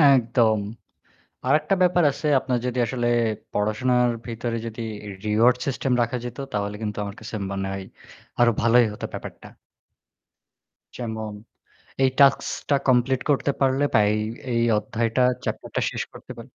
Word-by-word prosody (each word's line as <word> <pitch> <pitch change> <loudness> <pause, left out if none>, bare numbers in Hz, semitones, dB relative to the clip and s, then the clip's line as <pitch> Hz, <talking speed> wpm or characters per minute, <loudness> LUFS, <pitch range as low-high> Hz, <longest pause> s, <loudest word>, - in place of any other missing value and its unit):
একদম। 115 -3 +2 0.9
আরেকটা 150 +7 +3
ব্যাপার 180 -1 +4
আছে, 155 - -5
আপনার 125 -2 -1
যদি 125 0 -2
আসলে 120 -1 -1 0.4
পড়াশোনার 120 +4 +2 0.2
ভেতরে 115 0 -3
যদি 115 +1 -6 0.4
রিওয়ার্ড 115 +4 +4
সিস্টেম 135 -1 -1
রাখা 120 +2 -1
যেত 120 - -7
তাহলে 105 0 -2
কিন্তু 105 -1 -3
আমার 100 +1 -7
কাছে 110 0 -8 0.2
মনে 95 0 -3
হয় 95 -1 -5 0.5
আরো 120 -1 +5
ভালোই 120 +1 +5
হত - - -11
ব্যাপারটা। - - -8 1.5
যেমন 110 -3 -5 0.7
এই 130 - +5
টাস্কটা 140 +1 +3
কমপ্লিট 125 +1 +3
করতে 140 0 +2
পারলে 135 +1 +2
বা 110 - +5
এই 110 - 0 0.3
এই 115 - +2 0.2
অধ্যায়টা 115 +3 0 0.2
চ্যাপ্টারটা - - -3
শেষ - - -3
করতে - - -11
পা - - -7
120 Hz, 140 wpm, -24 LUFS, 110-130 Hz, 1.5 s, আরো